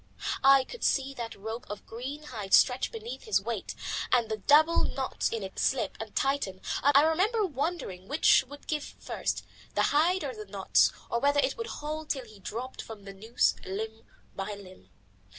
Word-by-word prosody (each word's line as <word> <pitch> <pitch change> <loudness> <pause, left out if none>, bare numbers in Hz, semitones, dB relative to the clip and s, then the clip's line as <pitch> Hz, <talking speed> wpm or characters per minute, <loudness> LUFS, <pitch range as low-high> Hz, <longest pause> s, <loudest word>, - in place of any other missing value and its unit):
I 270 0 +7
could 480 - -9
see 275 0 +2
that 235 -3 -6
rope 220 +4 -6
of 205 0 -7
green 265 +6 -6
hide 215 -9 +1
stretch 255 +1 +4
beneath 460 +2 -7
his 435 - +3
weight - - -4 0.4
and 235 -3 +3
the 220 - -1
double 305 +10 +5
knots 265 -1 -1
in 225 -3 -3
it 190 - -7
slip 260 -4 +1
and 220 -1 -7
tighten, 270 -9 0 0.2
and 285 0 +5
I 285 - +7
remember 395 +8 +2
wondering 280 - -3
which 295 - +5
would 285 +2 -12
give 300 -2 -1 0.2
first, - - -3 0.3
the - - +3
hide 345 +5 +3
or 270 -3 -3
the 215 -2 -8
knots, 195 -1 +3 0.2
or 235 - +1
whether 285 +2 +3
it - - +2
would 460 - -4
hold 305 +1 -5
till 265 -3 -1
he 215 -3 -15
dropped 240 +7 -5
from 220 -3 -10
the 195 - -8
noose 220 +4 +1
limb 220 +4 -5 0.3
by 195 +2 -4
limb. 185 - -14
255 Hz, 185 wpm, -29 LUFS, 215-295 Hz, 0.4 s, I